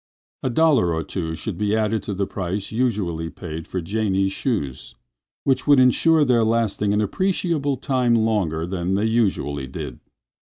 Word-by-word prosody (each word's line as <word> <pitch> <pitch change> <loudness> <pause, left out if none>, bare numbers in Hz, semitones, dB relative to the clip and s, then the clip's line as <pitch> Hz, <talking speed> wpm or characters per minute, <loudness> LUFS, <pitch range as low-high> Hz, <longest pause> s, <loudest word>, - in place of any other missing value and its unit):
A 130 - -1
dollar 125 - +3
or 80 - -2
two 80 -3 -4
should 80 - -5
be 105 0 +1
added 110 0 0
to 100 - -4
the 100 +1 0
price 95 +2 -4
usually 100 -9 -1
paid 80 -2 -7
for 90 - -3
Janie's 95 +1 0
shoes, 95 - -3 0.5
which 135 0 +1
would 145 -2 +6
insure 150 +5 +4
their 120 -3 +3
lasting 110 -2 +1
an 105 +1 +2
appreciable 155 - 0
time 125 -3 +1
longer 105 -8 0
than 90 +1 -2
they 105 +2 +1
usually 95 - 0
did. 65 -2 -7
105 Hz, 160 wpm, -22 LUFS, 85-125 Hz, 0.5 s, would